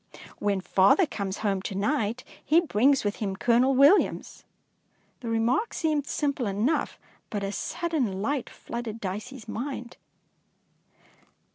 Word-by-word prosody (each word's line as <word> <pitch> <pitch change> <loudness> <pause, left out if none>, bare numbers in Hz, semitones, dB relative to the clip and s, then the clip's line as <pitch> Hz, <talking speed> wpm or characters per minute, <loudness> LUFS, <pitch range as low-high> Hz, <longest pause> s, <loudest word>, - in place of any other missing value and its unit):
When 200 -2 0
father 195 - +4
comes 200 -8 -4
home 195 -2 +1
to 195 - -5
night, 230 +2 -1 0.2
he 315 +4 +4
brings 275 -4 +2
with 205 0 -1
him 195 -3 -3
Colonel 245 +5 +3
Williams.'' 285 +10 +3 0.7
The 235 - -6
remark 230 - +1
seemed 305 -4 0
simple 280 -5 -1
enough, 215 +10 0 0.3
but 205 -2 -3
a 195 - -2
sudden 280 - -2
light 260 +5 -2
flooded 235 -2 -6
Dicey's 215 +6 -6
mind. 245 -1 -5
235 Hz, 125 wpm, -27 LUFS, 205-280 Hz, 0.7 s, father